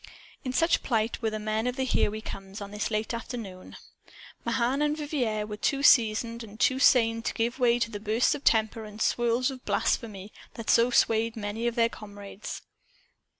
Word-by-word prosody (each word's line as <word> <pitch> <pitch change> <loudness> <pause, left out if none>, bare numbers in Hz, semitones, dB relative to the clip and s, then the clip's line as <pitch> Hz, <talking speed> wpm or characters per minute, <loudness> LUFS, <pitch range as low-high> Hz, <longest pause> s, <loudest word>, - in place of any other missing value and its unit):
In 255 - -2
such 330 +6 +2
plight 225 -1 -1
were 225 - +1
the 215 - -4
men 215 +2 -1
of 250 - -1
the 265 - -1
"Here 260 - +2
We 215 +1 -6
Comes," 195 -1 -8
on 200 -1 -7
this 210 0 -2
late 215 +1 -2
afternoon. 230 -6 -7 0.7
Mahan 260 +3 0
and 300 0 +1
Vivier 250 -9 -1
were 210 0 -6
too 275 +5 0
seasoned 230 -2 +4
and 215 0 -12
too 260 -1 +3
sane 230 -4 +4
to - - -2
give 235 +3 -1
way 240 -1 +4
to 230 -1 -1
the 205 - -5
bursts 220 +3 +2
of 290 - -6
temper 220 0 +2
and 210 -1 -10
the - - 0
swirls 240 +2 +1
of 255 -1 -10
blasphemy 205 -3 -1 0.2
that 230 - -1
swayed 230 -1 +3
so - - -6
many 215 +3 -3
of 235 - -1
their 230 -2 +4
comrades. 205 -2 -9
230 Hz, 195 wpm, -28 LUFS, 215-245 Hz, 0.7 s, seasoned